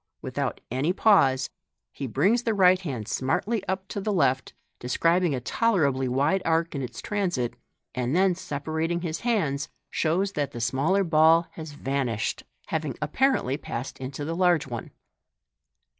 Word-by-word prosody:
Without - - -3
any 140 +8 +1
pause, 135 -12 +4 0.4
he 135 - -5
brings 205 - +2
the 225 -3 0
right 185 -1 +5
hand 130 - -4
smartly 190 - -1
up 190 0 -2
to 200 - -4
the 210 - -1
left, 135 -8 +1 0.3
describing 165 +6 +2
a - - -2
tolerably 140 - +1
wide 145 +9 +1
arc 165 +1 +1
in 140 - -3
its 125 - -6
transit, 175 - -1 0.4
and 125 +3 -1
then, 190 0 +4
sepa 155 -3 -5
rating 165 +2 0
his 165 -2 -3
hands, 160 - 0 0.2
shows 180 +5 +1
that 145 -6 -2
the 120 - -5
smaller 135 - +1
ball 165 0 +5
has 160 -2 -8
vanished, 135 -6 -2 0.3
having 155 -5 -2
apparently 150 - +1
passed 125 -2 -6
into 135 +2 -5
the 165 +2 -3
large 175 -3 +3
one. 120 -4 -6
155 Hz, 155 wpm, -26 LUFS, 135-185 Hz, 0.4 s, right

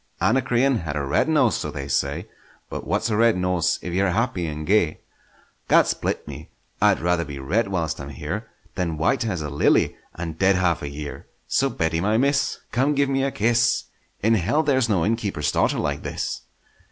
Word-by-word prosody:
Anacreon 125 +2 +2
had 80 -5 -4
a 70 - -1
red 70 - +1
nose, - - +3
so - - -4
they 70 0 -6
say; 70 - -1 0.4
But - - -5
what's - - 0
a - - +1
red 115 -2 +4
nose 90 -2 +1
if 90 - -4
ye're 95 +1 +2
happy 95 -3 0
and 75 0 -5
gay? 90 -5 +2 0.7
Gad - - +6
split - - -2
me! 75 +1 -9 0.3
I'd - - +4
rather 90 0 +1
be 75 -2 -7
red 90 +13 0
whilst 80 -6 -2
I'm 70 - -7
here, 80 - -5 0.2
Than 85 -4 -2
white 80 +8 +1
as 90 -7 -2
a 75 - -4
lily—and 80 +3 0
dead 95 0 +4
half 85 -3 +1
a 70 - -4
year! 75 +1 -7 0.2
So - - +2
Betty, 80 0 -1
my 105 +4 +2
miss, 140 +2 +1
Come 135 +5 +1
give 140 0 +2
me 135 0 +1
a 135 - +1
kiss; 120 0 +2 0.4
In 110 +2 +4
hell 115 - +2
there's 130 -5 +2
no 95 -6 +2
innkeeper's 105 -8 -1
daughter - - +1
like 70 0 -2
this! - - -4
90 Hz, 190 wpm, -23 LUFS, 80-115 Hz, 0.7 s, Gad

